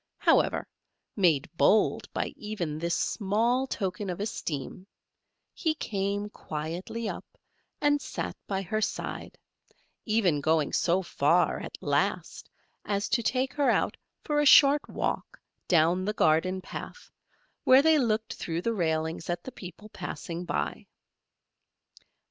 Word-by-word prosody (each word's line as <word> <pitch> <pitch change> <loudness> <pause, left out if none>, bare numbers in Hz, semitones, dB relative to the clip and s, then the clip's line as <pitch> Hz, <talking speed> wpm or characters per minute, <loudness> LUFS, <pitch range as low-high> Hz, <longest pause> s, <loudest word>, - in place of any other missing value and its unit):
However, - - +3 0.5
made 170 -7 +3
bold 215 - +3
by - - -3
even 180 -8 -4
this 170 +1 0
small 230 +6 +1
token 195 -3 -3
of 180 - -4
esteem, 180 -4 -4 0.7
he 320 -2 0
came 200 -3 -2
quietly 175 +6 -5
up, - - -5 0.6
and 290 0 +2
sat - - -4
by 195 -1 -2
her 215 +4 -2
side; - - -4 0.7
even 195 -9 +2
going 155 0 +1
so 185 +2 +2
far, 170 +1 +2
at - - -7
last, - - -1 0.3
as 200 0 -1
to 240 - +2
take 260 +3 0
her 285 -2 +2
out - - +1 0.3
for 295 -2 0
a 295 - +3
short 285 +1 +8
walk - - -3 0.3
down 175 +2 +3
the 210 +2 -1
garden 185 +1 +2
path, 485 - -9 0.5
where 260 +2 +7
they 320 -1 +5
looked 220 -3 0
through 165 +1 -4
the 230 - 0
railings 160 -3 -1
at 175 0 -2
the 260 - -7
people 185 +1 -10
passing 175 -2 -6
by. - - -3
195 Hz, 130 wpm, -28 LUFS, 170-230 Hz, 0.7 s, short